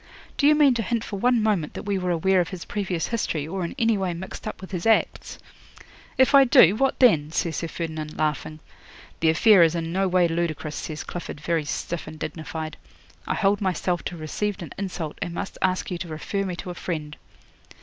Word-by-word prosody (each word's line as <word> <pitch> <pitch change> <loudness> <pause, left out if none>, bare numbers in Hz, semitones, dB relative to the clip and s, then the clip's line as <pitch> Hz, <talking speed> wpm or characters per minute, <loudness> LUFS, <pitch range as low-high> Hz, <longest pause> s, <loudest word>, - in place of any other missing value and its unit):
Do 285 - +3
you 300 - +6
mean 290 -3 +5
to 235 - -1
hint 230 +2 -1
for 200 -4 -5
one 245 0 +3
moment 200 -8 0
that - - -5
we 200 -2 -1
were 180 0 -2
aware 180 +2 +3
of 175 - -3
his 185 -3 -7
previous 190 -5 -2
history, 165 -10 -2
or 185 +2 -3
in 170 - -4
any 225 -4 +2
way 180 -3 -1
mixed 190 +3 -7
up - - -5
with 190 - -10
his 180 +1 -2
acts?" 225 - +1 0.8
'"If 260 +2 +4
I 275 -1 +9
do, 240 - +6
what 270 +3 +1
then?" 160 - +4
says 165 -1 -1
Sir 165 - -2
Ferdinand, 160 -2 -5
laughing. 155 0 -2 0.6
'"The 160 - +3
affair 190 +4 +6
is 165 0 +4
in 165 -1 -3
no 190 +1 +1
way 180 -1 +3
ludicrous," 165 -2 -2
says 155 -1 -5
Clifford, 175 -4 -7
very 160 0 -1
stiff 170 +2 -4
and 155 0 -8
dignified. 160 0 -5 0.5
"I - - 0
hold 200 0 +2
myself 180 -2 0
to - - -3
have 165 - -9
received 200 +5 -3
an 165 - -9
insult, 180 -6 -5
and 170 - -3
must - - -5
ask 185 0 0
you 175 - -3
to 175 - -5
refer 180 +5 -3
me 180 -2 -3
to 180 +1 -6
a - - -5
friend." 155 -4 -5
180 Hz, 220 wpm, -24 LUFS, 160-205 Hz, 0.8 s, I